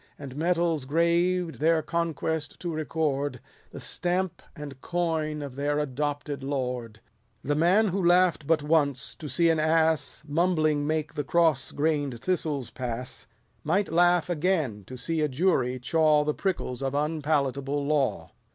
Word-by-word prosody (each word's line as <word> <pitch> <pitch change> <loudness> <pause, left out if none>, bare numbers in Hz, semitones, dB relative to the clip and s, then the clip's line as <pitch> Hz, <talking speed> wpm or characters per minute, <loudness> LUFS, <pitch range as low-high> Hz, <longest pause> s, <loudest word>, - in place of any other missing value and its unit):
And 135 -3 -9
medals 165 -2 +1
graved 170 +3 +1
their 160 +1 +3
conquest 160 -2 -2
to 175 -2 -3
record, 145 -4 -1 0.3
The - - -9
stamp 180 0 -2
and 145 -4 -9
coin 160 -4 -1
of 140 -3 -7
their 145 +1 0
adopted 145 0 -2
lord. 125 -5 -3 0.4
The 145 - 0
man 175 +8 +4
l 200 - 0
who 195 +1 -1
laugh'd 175 -4 +3
but 160 -2 +2
once, 145 -4 +1
to 150 - -8
see 165 +6 +3
an 160 - +1
ass 160 0 +1
Mumbling 155 -1 +2
to - - -2
make 155 -1 -1
the 145 - -2
cross 160 -3 +2
grain'd 145 -5 -1
thistles 150 -6 -1
pass, 125 +1 -5 0.4
Might 185 +5 +1
laugh 175 0 +4
again 155 - -1
to 130 +5 -9
see 160 +5 -1
a 150 - +2
jury 130 -4 +1
chaw 150 +3 +3
The 150 0 0
prickles 155 -10 -3
of 135 0 -2
unpalatable 145 -2 0
law. 145 -3 0
155 Hz, 150 wpm, -27 LUFS, 140-170 Hz, 0.4 s, man